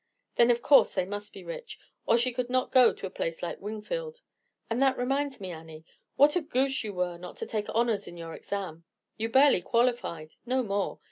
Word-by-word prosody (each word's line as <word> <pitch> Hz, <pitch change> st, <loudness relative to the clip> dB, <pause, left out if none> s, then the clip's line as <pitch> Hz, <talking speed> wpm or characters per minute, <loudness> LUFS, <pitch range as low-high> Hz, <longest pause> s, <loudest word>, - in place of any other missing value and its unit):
"Then, 235 Hz, 0 st, +5 dB
of 235 Hz, 0 st, +2 dB
course, 285 Hz, -, +5 dB
they 185 Hz, -2 st, +1 dB
must 205 Hz, +2 st, -6 dB
be -, -, -11 dB
rich, -, -, -7 dB, 0.3 s
or 230 Hz, -, +5 dB
she 245 Hz, +2 st, +1 dB
could 245 Hz, 0 st, -2 dB
not 255 Hz, 0 st, 0 dB
go 255 Hz, -2 st, +7 dB
to -, -, -8 dB
a -, -, -4 dB
place 165 Hz, -2 st, -4 dB
like 175 Hz, -, -4 dB
Wingfield. 470 Hz, -, -5 dB, 0.5 s
And 230 Hz, +3 st, -1 dB
that 265 Hz, -1 st, +3 dB
reminds 275 Hz, +2 st, -1 dB
me, 190 Hz, -2 st, -6 dB
Annie, 160 Hz, -1 st, -10 dB, 0.3 s
what 290 Hz, +3 st, +5 dB
a 355 Hz, -, +2 dB
goose 270 Hz, -3 st, 0 dB
you 215 Hz, -, -4 dB
were 180 Hz, -1 st, -2 dB
not 180 Hz, 0 st, -9 dB
to -, -, -3 dB
take 210 Hz, -2 st, -3 dB
honors 230 Hz, -2 st, 0 dB
in 175 Hz, -, -9 dB
your 165 Hz, -1 st, -7 dB
exam. 180 Hz, -5 st, -5 dB, 0.3 s
You 225 Hz, +1 st, -2 dB
barely 265 Hz, -5 st, +5 dB
qualified—no 235 Hz, +1 st, -1 dB
more. 200 Hz, -2 st, -2 dB
230 Hz, 205 wpm, -28 LUFS, 185-260 Hz, 0.5 s, go